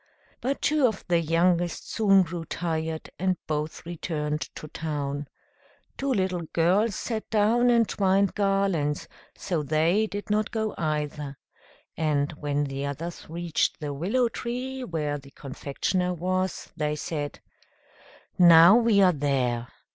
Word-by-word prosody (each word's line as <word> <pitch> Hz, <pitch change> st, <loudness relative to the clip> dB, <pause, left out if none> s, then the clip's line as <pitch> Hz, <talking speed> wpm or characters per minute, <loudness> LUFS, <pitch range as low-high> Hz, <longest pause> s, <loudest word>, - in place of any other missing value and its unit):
But 275 Hz, +3 st, -2 dB
two 300 Hz, -3 st, +4 dB
of 220 Hz, -4 st, -4 dB
the 170 Hz, -1 st, +4 dB
youngest 170 Hz, +1 st, +1 dB
soon 195 Hz, -3 st, +5 dB
grew 170 Hz, 0 st, -5 dB
tired, 160 Hz, -1 st, -3 dB
and 185 Hz, 0 st, +1 dB
both 155 Hz, +1 st, -3 dB
returned 155 Hz, -3 st, -3 dB
to 155 Hz, -, -8 dB
town; 145 Hz, -3 st, -3 dB, 0.7 s
two 275 Hz, 0 st, -2 dB
little 185 Hz, -6 st, 0 dB
girls 190 Hz, +6 st, +2 dB
sat 225 Hz, -3 st, -4 dB
down, 225 Hz, +3 st, +3 dB
and 235 Hz, -2 st, +4 dB
twined 195 Hz, 0 st, +2 dB
garlands, 195 Hz, -7 st, 0 dB, 0.3 s
so 170 Hz, -5 st, -2 dB
they 160 Hz, +8 st, +2 dB
did 205 Hz, 0 st, -5 dB
not 215 Hz, 0 st, +1 dB
go 220 Hz, -2 st, -2 dB
either; 150 Hz, -3 st, -3 dB, 0.6 s
and 150 Hz, -2 st, 0 dB
when 145 Hz, -1 st, -2 dB
the 135 Hz, -1 st, -4 dB
others 165 Hz, +5 st, -6 dB
reached 170 Hz, 0 st, -1 dB
the 145 Hz, -2 st, -4 dB
willow 210 Hz, -, +1 dB
tree, 255 Hz, +3 st, -4 dB
where 150 Hz, -8 st, -2 dB
the 140 Hz, 0 st, -15 dB
confectioner 150 Hz, +7 st, -2 dB
was, 185 Hz, +1 st, -2 dB
they 150 Hz, 0 st, -1 dB
said, 150 Hz, -1 st, -4 dB, 1.0 s
"Now 170 Hz, +2 st, +9 dB
we 225 Hz, -4 st, +4 dB
are 180 Hz, -1 st, +5 dB
there! 130 Hz, -5 st, 0 dB
170 Hz, 135 wpm, -26 LUFS, 150-200 Hz, 1.0 s, Now